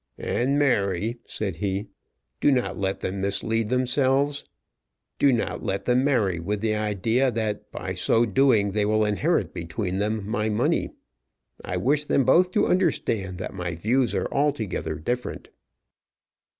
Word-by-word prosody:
"And, 135 +4 0
Mary," 110 -5 +1
said 95 -6 -3
he, 100 +2 -2 0.5
"do - - +3
not 125 -2 0
let 95 0 -2
them 95 +1 -3
mislead 110 +3 0
themselves. 135 +3 +2 0.8
Do 140 - +5
not 120 - -1
let 95 - -2
them 125 +1 +3
marry 110 -11 +1
with 100 +4 -3
the 110 -1 +1
idea 110 +5 +1
that 110 -3 -3
by 95 0 -5
so 115 +6 +2
doing 110 -3 +3
they 105 +1 0
will 110 +1 +2
inherit 105 -3 0
between 90 +3 -3
them 105 0 -1
my 110 -1 -1
money. 105 - +1 0.7
I - - -3
wish 150 +3 +1
them 135 -3 +2
both 180 +7 +5
to - - +3
understand 115 - 0
that 95 - -5
my 90 -3 -4
views 115 +5 +1
are 95 - 0
altogether 140 -7 -1
different." 125 +10 -4
110 Hz, 150 wpm, -25 LUFS, 100-130 Hz, 0.8 s, Do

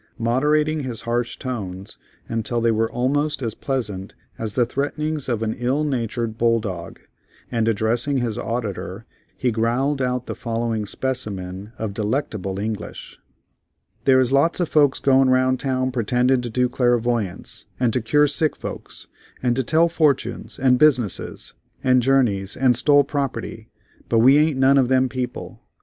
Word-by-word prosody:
Moderating 150 +6 +1
his 120 -5 -5
harsh 120 0 -2
tones 100 -6 -6 0.3
until 115 +1 -2
they 115 0 +2
were 110 0 0
almost 140 +3 0
as 115 -2 -2
pleasant 105 -8 -4 0.2
as 110 -2 -3
the 125 - +3
threatenings 145 +3 -2
of 115 -2 -1
an 110 0 -1
ill 130 +5 0
natured 115 -5 -2
bull 115 0 +3
dog, 95 -6 -6 0.5
and 115 -2 0
addressing 115 +6 +1
his 120 -4 -1
auditor, 110 -3 -4 0.3
he 125 - 0
growled 125 +5 0
out 125 -1 -1
the - - -4
following 115 -2 -2
specimen 100 -6 -4
of 110 -3 -4
delectable 105 -3 -2
English: 105 +1 -6 0.9
"There 130 -1 +5
is 130 -1 +2
lots 140 +6 +3
of 175 - 0
folks 145 -3 +3
goin' 135 -1 +4
round 130 0 +3
town 130 -1 -1
pretendin' 125 +2 +1
to 120 - -5
do 125 +2 +1
clairvoyance, 120 -5 -1
and 120 -3 +2
to 125 - 0
cure 145 +7 +3
sick 150 +2 +1
folks, - - -7 0.4
and 120 -1 +2
to 130 - +1
tell 160 +6 +3
fortunes, 145 -8 0
and 125 -1 +3
business, 130 - +1 0.3
and 130 -1 +4
journeys, 115 -7 +1
and 130 -2 +3
stole 145 +4 +5
property; 130 -5 -4 0.4
but 115 - +2
we 130 +6 +6
ain't 155 -2 +2
none 135 +1 +5
of 130 - +3
them 130 0 +2
people. 125 -1 -5
125 Hz, 155 wpm, -22 LUFS, 115-135 Hz, 0.9 s, we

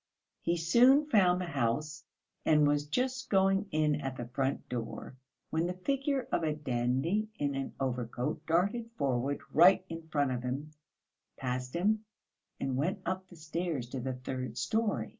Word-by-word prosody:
He 170 +1 0
soon 245 - +5
found 185 -10 +4
the 180 - -2
house, 150 +1 -1 0.4
and 150 -1 +5
was 145 0 +1
just 255 - -1
going 195 +1 +3
in 150 -2 +1
at 135 -1 -3
the 120 - -4
front 135 +2 -1
door, 120 +1 -5 0.4
when 165 +2 +1
the 180 - -3
figure 275 -1 0
of - - +1
a 155 -2 0
dandy 135 - 0
in 145 -1 0
an 135 0 -4
overcoat 125 +1 -2
darted 200 +8 +1
forward 135 +1 0
right 185 +3 +6
in 165 -1 -7
front 145 -4 +1
of 125 -1 -2
him, 135 +5 -4 0.7
passed 125 +1 -3
him 210 +5 +2 0.6
and 130 -1 -1
went 185 +8 -1
up 185 +1 -2
the 180 - -14
stairs 160 -5 -3
to 130 - -4
the 130 +1 -2
third 130 -1 -5
storey. 215 - 0
155 Hz, 160 wpm, -31 LUFS, 130-190 Hz, 0.7 s, right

